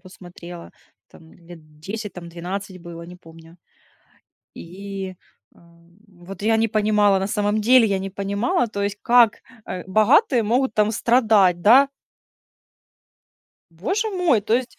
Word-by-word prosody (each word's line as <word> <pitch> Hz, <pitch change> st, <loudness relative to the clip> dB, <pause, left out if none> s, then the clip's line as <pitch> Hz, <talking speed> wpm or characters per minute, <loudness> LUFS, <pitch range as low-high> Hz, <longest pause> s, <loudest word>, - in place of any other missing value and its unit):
посмотрела, 175 Hz, -2 st, -12 dB, 0.4 s
там 160 Hz, -1 st, -18 dB, 0.2 s
лет 155 Hz, -3 st, -15 dB
10, 210 Hz, +4 st, -6 dB
там 170 Hz, -1 st, -10 dB
12 185 Hz, +3 st, -7 dB
было, 170 Hz, -1 st, -10 dB
не 180 Hz, +1 st, -12 dB
помню. 165 Hz, -1 st, -17 dB, 1.0 s
И, 190 Hz, +2 st, -8 dB, 0.4 s
а, -, -, -24 dB
м, 170 Hz, 0 st, -24 dB, 0.3 s
вот 195 Hz, 0 st, -10 dB
я 225 Hz, +1 st, +2 dB
не 225 Hz, -, +1 dB
понимала, 210 Hz, -2 st, +2 dB
на 190 Hz, -, -2 dB
самом 210 Hz, +1 st, -1 dB
деле, 240 Hz, +2 st, +5 dB
я 200 Hz, -2 st, -1 dB
не 195 Hz, +1 st, -6 dB
понимала, 200 Hz, +5 st, -1 dB
то 200 Hz, -2 st, -5 dB
есть, 200 Hz, +1 st, -3 dB
как, 240 Hz, -2 st, +4 dB, 0.3 s
э, 180 Hz, -, -6 dB
богатые 235 Hz, -, +3 dB
могут 240 Hz, +2 st, 0 dB
там 210 Hz, 0 st, +2 dB
страдать, 215 Hz, -7 st, +2 dB
да. 260 Hz, +8 st, +6 dB, 1.8 s
Боже 380 Hz, -, -3 dB
мой, 355 Hz, -, +1 dB
то 220 Hz, +2 st, -1 dB
есть, 250 Hz, 0 st, -3 dB
200 Hz, 140 wpm, -21 LUFS, 175-225 Hz, 1.8 s, да